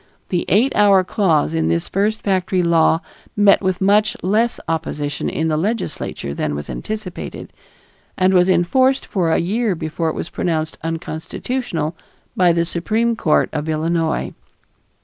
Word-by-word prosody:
The 175 Hz, -2 st, -1 dB
eight 235 Hz, +8 st, +3 dB
hour 200 Hz, -2 st, +5 dB
clause 170 Hz, -, +1 dB
in 80 Hz, 0 st, 0 dB
this 85 Hz, 0 st, 0 dB
first 210 Hz, +3 st, -1 dB
factory 185 Hz, -2 st, +1 dB
law 165 Hz, -1 st, +3 dB, 0.3 s
met 205 Hz, -1 st, +5 dB
with 185 Hz, -2 st, -1 dB
much 210 Hz, +2 st, +3 dB
less 220 Hz, +6 st, +1 dB
opposition 150 Hz, -3 st, -2 dB
in 160 Hz, -, -1 dB
the 155 Hz, -1 st, 0 dB
Legislature 190 Hz, -, -3 dB
than 75 Hz, 0 st, -2 dB
was 75 Hz, 0 st, -6 dB
anticipated, 215 Hz, -4 st, -6 dB, 0.6 s
and 185 Hz, +1 st, +3 dB
was 180 Hz, 0 st, +4 dB
enforced 260 Hz, +10 st, +2 dB
for 180 Hz, -5 st, 0 dB
a 160 Hz, -, +3 dB
year 210 Hz, +3 st, 0 dB
before 160 Hz, +1 st, -2 dB
it -, -, -4 dB
was -, -, -5 dB
pronounced 160 Hz, -2 st, -2 dB
unconstitutional 165 Hz, +3 st, -3 dB, 0.4 s
by 180 Hz, -2 st, +4 dB
the 170 Hz, 0 st, +1 dB
Supreme 220 Hz, +8 st, 0 dB
Court 160 Hz, -8 st, +2 dB
of 155 Hz, 0 st, -3 dB
Illinois. 160 Hz, +1 st, -1 dB
175 Hz, 150 wpm, -19 LUFS, 160-205 Hz, 0.6 s, hour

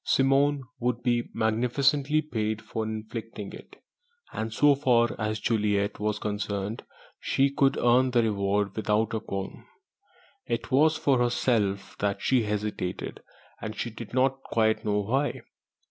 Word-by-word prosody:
Simone 135 Hz, +1 st, +3 dB, 0.2 s
would 120 Hz, 0 st, -1 dB
be 120 Hz, -2 st, +1 dB
magnificently 135 Hz, +7 st, +1 dB
paid 110 Hz, -6 st, -2 dB
for 110 Hz, 0 st, -4 dB
inflicting 110 Hz, -1 st, -6 dB
it, -, -, -12 dB, 0.6 s
and 110 Hz, +1 st, -3 dB
so 145 Hz, +6 st, +5 dB
far 120 Hz, -4 st, +2 dB
as 110 Hz, 0 st, -1 dB
Juliet 105 Hz, -2 st, 0 dB
was 105 Hz, 0 st, -1 dB
concerned, 105 Hz, 0 st, -3 dB, 0.4 s
she 135 Hz, +1 st, +1 dB
could 140 Hz, -1 st, +2 dB
earn 125 Hz, +2 st, +4 dB
the 120 Hz, -2 st, +3 dB
reward 100 Hz, -2 st, 0 dB
without 110 Hz, 0 st, 0 dB
a 110 Hz, -, 0 dB
qualm. 100 Hz, -2 st, -6 dB, 0.8 s
It 120 Hz, +3 st, -3 dB
was 155 Hz, +4 st, +4 dB
for 140 Hz, -4 st, +2 dB
herself 115 Hz, -5 st, 0 dB
that 100 Hz, -1 st, 0 dB
she 130 Hz, -2 st, +2 dB
hesitated; 105 Hz, -3 st, -3 dB, 0.4 s
and 110 Hz, 0 st, -5 dB
she 120 Hz, -, -3 dB
did 110 Hz, 0 st, -9 dB
not 135 Hz, +1 st, +1 dB
quite 110 Hz, -3 st, +1 dB
know 105 Hz, -1 st, +1 dB
why. 135 Hz, +8 st, -1 dB
115 Hz, 140 wpm, -27 LUFS, 105-130 Hz, 0.8 s, so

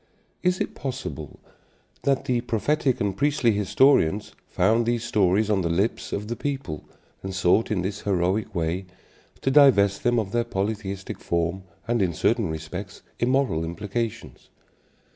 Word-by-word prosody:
Is 180 Hz, 0 st, +1 dB
it -, -, -2 dB
possible 125 Hz, -, -6 dB, 0.6 s
that 135 Hz, -1 st, +1 dB
the 125 Hz, -2 st, +1 dB
prophetic 125 Hz, +4 st, 0 dB
and 100 Hz, -2 st, -1 dB
priestly 140 Hz, -2 st, +2 dB
historians 105 Hz, -, +3 dB
found 115 Hz, +5 st, +2 dB
these 120 Hz, -1 st, 0 dB
stories 105 Hz, -2 st, +2 dB
on 105 Hz, -3 st, +2 dB
the 85 Hz, -, -1 dB
lips 95 Hz, +7 st, -1 dB
of 105 Hz, +1 st, -3 dB
the 120 Hz, -, -3 dB
people 135 Hz, -, -4 dB, 0.4 s
and 95 Hz, -1 st, -5 dB
sought 95 Hz, +4 st, +3 dB
in 95 Hz, -5 st, 0 dB
this 100 Hz, +2 st, -3 dB
heroic 95 Hz, +2 st, 0 dB
way 85 Hz, +3 st, -1 dB, 0.5 s
to 135 Hz, -, +1 dB
divest 110 Hz, -9 st, +5 dB
them 120 Hz, 0 st, +2 dB
of 105 Hz, -4 st, -1 dB
their 120 Hz, +1 st, +1 dB
polytheistic 100 Hz, -3 st, -4 dB
form 85 Hz, +2 st, -1 dB, 0.2 s
and, 120 Hz, -1 st, +1 dB
in 90 Hz, -3 st, +1 dB
certain -, -, +1 dB
respects, 90 Hz, +5 st, -6 dB, 0.2 s
immoral 125 Hz, -, +1 dB
implications? 105 Hz, +7 st, -5 dB
105 Hz, 145 wpm, -25 LUFS, 95-120 Hz, 0.6 s, divest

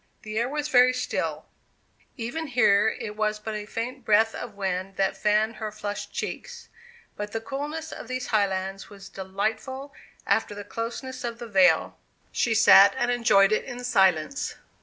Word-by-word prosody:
The 215 Hz, 0 st, -3 dB
air 240 Hz, +2 st, 0 dB
was 295 Hz, +1 st, -2 dB
very 255 Hz, -3 st, +5 dB
still; 250 Hz, 0 st, -3 dB, 0.7 s
even 260 Hz, +7 st, -4 dB
here 220 Hz, -5 st, +4 dB
it 210 Hz, -, -6 dB
was 215 Hz, 0 st, 0 dB
but 215 Hz, +1 st, -6 dB
a 210 Hz, -1 st, -5 dB
faint 245 Hz, +4 st, -5 dB
breath 220 Hz, 0 st, +3 dB
of 230 Hz, -4 st, -7 dB
wind 190 Hz, -1 st, -3 dB
that 195 Hz, 0 st, 0 dB
fanned 215 Hz, +2 st, +1 dB
her 215 Hz, -1 st, -4 dB
flushed 205 Hz, -1 st, -5 dB
cheeks; 475 Hz, -1 st, -6 dB, 0.5 s
but 210 Hz, 0 st, -6 dB
the 225 Hz, -, -1 dB
coolness 295 Hz, +6 st, -5 dB
on -, -, -9 dB
these 255 Hz, +1 st, -3 dB
highlands 195 Hz, -2 st, 0 dB
was 195 Hz, -1 st, -12 dB
delightful 220 Hz, +9 st, -4 dB, 0.3 s
after 205 Hz, -, +1 dB
the 205 Hz, -, -7 dB
closeness 245 Hz, +4 st, -5 dB
of 235 Hz, -1 st, -4 dB
the 240 Hz, -, -7 dB
vale. 185 Hz, -6 st, +3 dB, 0.3 s
She 230 Hz, -2 st, +1 dB
sat 200 Hz, 0 st, +7 dB
and 245 Hz, -1 st, +1 dB
enjoyed 215 Hz, -5 st, +4 dB
it 215 Hz, -, +1 dB
in 245 Hz, -1 st, -7 dB
silence. 190 Hz, -, +1 dB
220 Hz, 165 wpm, -26 LUFS, 200-250 Hz, 0.7 s, sat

